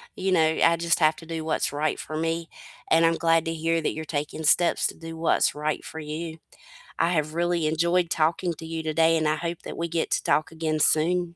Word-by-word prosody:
you 190 0 -1
know, 170 -3 +4 0.2
I 170 - +5
just 170 0 +1
have 155 -1 +4
to 165 - -12
do 165 -1 -5
what's 160 - 0
right 150 +1 -1
for 155 - -6
me, 165 +1 -2 0.4
and 165 +1 +5
I'm 165 0 +3
glad 165 0 +2
to 165 - -2
hear 165 +1 0
that - - -1
you're 160 - -5
taking 150 +1 -4
steps 170 +2 +3
to - - -7
do 165 0 -9
what's 165 - +2
right 150 0 -3
for 160 - -8
you. 160 +2 -6 0.6
I 165 - +3
have 155 -3 -1
really 170 -1 0
enjoyed 170 +2 +1
talking 165 +2 0
to 160 - -10
you 160 0 -5
today, 160 +1 +2
and 155 -1 0
I 155 - +2
hope 170 0 -4
that - - -7
we 170 - -2
get 165 -1 -2
to - - +1
talk 155 +1 +1
again 160 -1 -2
soon. 170 +3 +2
165 Hz, 235 wpm, -25 LUFS, 155-170 Hz, 0.6 s, I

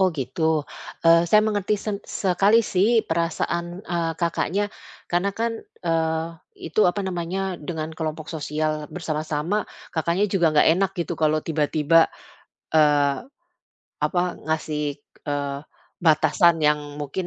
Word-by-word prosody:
Oh 190 - +5
gitu. 130 +4 -4 0.6
Eh, 165 0 +7
saya 215 - +6
mengerti 210 -1 0
seng 200 0 -4
sekali 200 +3 +3
sih 215 +5 +2
perasaan, 170 +2 -2
eee, 170 -1 0
Kakaknya. 170 +3 0 0.5
Karena 175 +3 +1
kan, 230 0 0 0.3
eee, 160 -1 0 0.4
itu 165 +6 0
apa 205 +3 -1
namanya 185 0 -3
dengan 160 0 -4
kelompok 155 -1 -4
sosial 155 0 -2
bersama-sama, 160 +3 -2 0.2
Kakaknya 170 +4 +1
juga 180 -4 +3
nggak 150 - +5
enak 190 +2 +1
gitu 170 -2 -2
kalau 155 0 +3
tiba-tiba, 155 +1 +3 0.7
eee, 145 -2 +4 0.9
apa, 180 - +1 0.3
ngasih, 150 -2 -1 0.3
eee, 140 -1 -2 0.5
batasan 170 +2 +5
yang 150 0 +4 0.2
mungkin, 150 +6 -3
165 Hz, 120 wpm, -23 LUFS, 155-185 Hz, 0.9 s, Eh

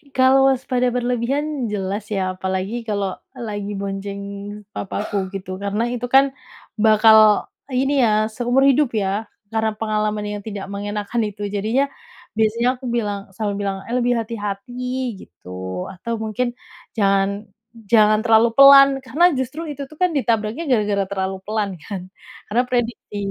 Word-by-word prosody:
Kalau 265 +1 +5
waspada 250 -1 +1
berlebihan, 250 +3 -1
jelas 200 +1 -3
ya, 190 -3 -1
apalagi 190 +5 -2
kalau 200 -3 -1 0.2
lagi 205 -3 -4
bonceng 200 0 -4 0.5
papaku 195 0 -3
gitu 185 -1 -5
karena 200 +3 -1
itu 245 0 -3
kan 270 +1 +5 0.5
bakal 215 -1 +6 0.2
ini 270 +2 +2
ya, 215 0 +2
seumur 245 +4 +1
hidup 275 0 +4
ya 205 +1 -1 0.3
karena 220 0 +1
pengalaman 215 -1 -1
yang 205 0 -4
tidak 205 -3 -5
mengenakkan 205 +3 -3
itu, 205 0 -5
jadinya 220 +7 +1 0.5
biasanya 230 +3 +2
aku 255 +1 -12
bilang 205 -4 -3
selalu 205 +1 -3
bilang 195 -1 -2
eh 240 - -1
lebih 245 0 +2
hati-hati 215 0 -5 0.5
gitu. 90 +1 -7
Atau 230 +6 -4
mungkin 240 +3 -2 0.4
jangan, 200 +1 +1 0.4
jangan 215 -1 +5
terlalu 225 0 +5
pelan 275 0 +9 0.2
karena 345 +7 +4
justru 260 +5 -3
itu 280 -1 -6
tuh 310 - -15
kan 360 -1 +3
ditabraknya 230 +3 0
gara-gara 205 -5 +2
terlalu 190 0 -2
pelan 215 -1 -1
kan? 195 -3 -5 0.5
Karena 240 +3 +3
prediksi, 240 -4 -2
215 Hz, 140 wpm, -21 LUFS, 200-245 Hz, 0.5 s, pelan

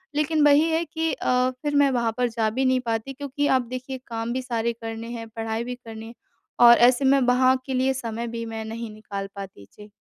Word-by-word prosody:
लेकिन 305 +1 +2
वही 290 +1 +6
है 325 +1 +1
कि 325 0 -2
अ, 250 0 +1
फिर 295 -1 -2
मैं 285 -1 +5
वहाँ 235 -3 0
पर 250 0 +2
जा 225 -1 0
भी 260 +5 -1
नहीं 260 0 +3
पाती 225 +4 -2
क्योंकि 285 +1 -2
आप 255 - 0
देखिए 255 +1 -5
काम 230 0 -3
भी 260 - -2
सारे 235 -2 -2
करने 225 0 -7
हैं, 230 -1 -6
पढ़ाई 225 0 -3
भी 250 +1 -5
करनी 225 -2 -10
है 230 - -10 0.5
और 235 0 +9
ऐसे 245 +3 +4
में 275 +1 +5
वहाँ 255 +1 +4
के 265 - -4
लिए 260 +1 +2
समय 235 -2 -4
भी 230 0 -5
मैं 225 -1 -5
नहीं 225 +1 -6
निकाल 205 -2 -6
पाती। 195 - -9
जी। 210 0 -14
240 Hz, 225 wpm, -24 LUFS, 225-265 Hz, 0.5 s, और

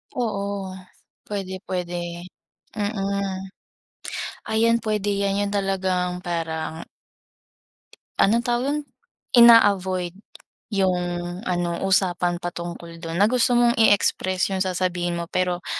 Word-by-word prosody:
Oo, 200 -5 -2 0.6
pwede, 195 -2 -4
pwede, 180 -1 -3 0.8
mm. 200 -2 -2 1.1
Ayan 230 +1 +3
pwede 210 -1 0
yan 200 0 +1
yun 200 0 -1
talagang 185 -2 0
parang 160 -1 -3 1.3
Anong 230 +4 +4
tawag 240 +1 0
don, 295 +2 0 0.6
ina-avoid 190 -6 +6 0.5
yung 190 -4 +1 0.5
ano 175 -1 -1
usapan 180 -2 +2
patungkol 170 -1 -6
dun 165 0 -5
na 200 - +5
gusto 245 +1 +3
mong 240 0 +5
i-express 190 -3 +3
yung 190 - -1
sasabihin 180 -2 -1
mo, 170 - -3
pero 180 -1 0
190 Hz, 105 wpm, -23 LUFS, 175-205 Hz, 1.3 s, ina-avoid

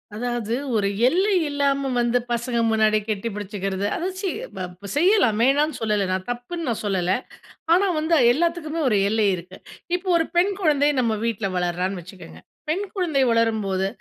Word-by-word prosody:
அதாவது. 240 -1 -2 0.2
ஒரு 205 -2 +2 0.2
எல்லை 380 +8 +2 0.2
இல்லாம 280 -1 0
வந்து 240 +1 +2
பசங்க 235 0 -1
முன்னாடி 215 -1 +3
கட்டி 210 +1 -2
பிடிச்சுக்கிறது. 195 -1 -3
அத 345 - -3 0.2
சி 385 - -1 0.3
ப 185 +2 -7
செய்யலாம் 300 - +3
வேணான்னு 290 +4 +2
சொல்லல, 210 -3 0
நான் 185 0 -2
தப்புன்னு 300 +8 -5
நான் 230 - -2
சொல்லல. 185 -2 +1 0.6
ஆனா, 390 +3 +4
வந்து 325 +2 +2 0.2
எல்லாத்துக்குமே 330 +1 -1
ஒரு 210 - +2
எல்லை 220 -1 +2
இருக்கு. 180 +2 -10 0.4
இப்போ, 365 +1 -6
ஒரு 325 - +1
பெண் 380 +3 +4
குழந்தை 295 -4 +3
நம்ம 225 -2 +1
வீட்ல 215 -4 -1
வளர்றான்னு 180 +2 -1
வச்சுக்கங்க. 165 - -13 0.3
பெண் 380 +6 0
குழந்தை 315 -8 +1
வளரும்போது 215 -4 +1
230 Hz, 155 wpm, -23 LUFS, 195-305 Hz, 0.6 s, ஆனா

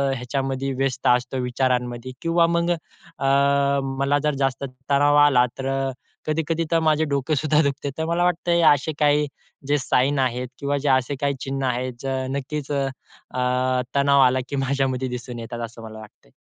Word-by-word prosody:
ह्याच्यामध्ये 135 +2 -2
व्यस्त 135 -1 -1
असतो 125 +1 +2
विचारांमध्ये 125 -1 -1
किंवा 165 0 +3
मग 170 0 0
अ, 160 -4 -7 0.7
मला 140 +1 +2
जर 150 -2 +1
जास्त 135 -1 0 0.3
तणाव 145 +1 +4
आला, 125 -4 +5
तर 135 - -5
अ, 135 0 -1 0.3
कधी-कधी 160 +1 -1
तर 165 - +4
माझे 155 0 +3
डोकं 140 +2 0
सुद्धा 155 +1 +2
दुखते. 140 0 -2
तर 160 - -1
मला 170 +1 0
वाटतंय, 175 -1 +1
असे 145 +3 -2
काही 150 0 +3 0.4
जे 145 - +3
साईन 135 +1 +1
आहेत 125 -1 0
किंवा 140 0 -1
जे 140 +1 -1
असे 130 +1 +2
काही 140 0 +1
चिन्ह 135 0 -3
आहेत, 125 +1 -3
अ, 130 -1 -1
नक्कीच 140 +2 -4
अ, 140 -1 0 1.1
तणाव 140 0 +4
आला 130 0 +4
की 140 - -3
माझ्यामध्ये 135 -1 0
दिसून 125 -1 -6
येतात 115 +1 -6
असं 115 0 -12
मला 110 0 -9
वाटतंय. 105 - -16
135 Hz, 170 wpm, -23 LUFS, 130-145 Hz, 1.1 s, आला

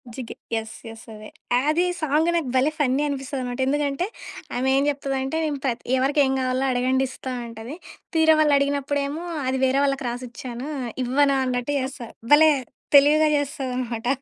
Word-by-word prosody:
జిగే 250 -3 -7 0.2
yes. 220 0 -4
Yes. 225 0 -11
అదే. 215 0 -10 0.3
అస్ 300 +5 +1
యే - - +1
song 310 +2 +2
నాకు 320 -6 -1
భలే 270 +4 +3
ఫన్నీ 270 0 +2
అనిపిస్తదనమాట. 265 -2 -4
ఎందుకంటే 290 +3 0 0.5
ఆమె 255 +2 0
ఏం 275 - +3
జెప్తదంటే, 270 +1 -2 0.3
ప్ర 260 - +2 0.3
ఎవరికేం 275 +1 +2
కావాలో 255 +1 0
అడగండిస్తా 260 +1 -1
అంటది. 230 +4 -8 0.4
తీరా 320 0 +5
వాళ్ళడిగినప్పుడు 285 -1 +2
ఏమో! 305 +4 -5 0.2
అది 260 0 0
వేరే 265 +1 +2
వాళ్ళకి 275 -1 -1
రాసిచ్చాను. 245 +2 -6 0.4
ఇవ్వను 275 +2 +3
అన్నట్టు 250 +2 -1
చేస్తా. 260 -2 -5 0.3
భలే 310 +1 +7 0.4
తెలివిగా 300 +2 +6
జేస్తదన్నమాట! 255 -5 -3
270 Hz, 140 wpm, -23 LUFS, 255-290 Hz, 0.5 s, భలే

